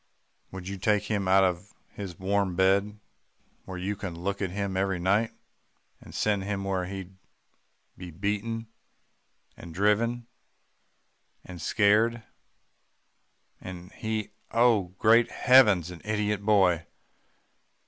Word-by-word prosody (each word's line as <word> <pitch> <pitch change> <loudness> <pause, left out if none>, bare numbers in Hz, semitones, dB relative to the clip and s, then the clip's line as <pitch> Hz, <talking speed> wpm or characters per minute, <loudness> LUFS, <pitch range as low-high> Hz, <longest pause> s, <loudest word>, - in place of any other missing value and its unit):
Would 95 -1 -8
you 100 0 -5
take 105 +2 +2
him 100 -2 -2
out 95 +1 +5
of 90 +2 -2 0.2
his 95 -5 -8
warm 95 -1 0
bed, 100 +3 +2 0.7
where 95 -1 -7
you 95 +3 -3
can 95 -4 -6
look 100 +4 -3
at 95 - -1
him 100 +1 -3
every 95 -1 0
night, 100 +6 +1 0.7
and - - -13
send 105 -2 0
him 100 0 -3
where 95 -2 -1
he'd 95 0 -8 0.8
be 90 -1 -9
beaten, 105 +6 -3 0.9
and 85 -2 -11
driven 115 +5 +1 1.2
and 90 -3 -9
scared 110 +3 +2 1.4
and 90 0 -9
he 110 -2 -4 0.2
oh! 115 -6 +2
great 115 +3 +4
heavens 105 -10 +5
an 85 - -10
idiot 105 -1 -1
boy. 95 -5 +3
100 Hz, 120 wpm, -27 LUFS, 95-105 Hz, 1.4 s, out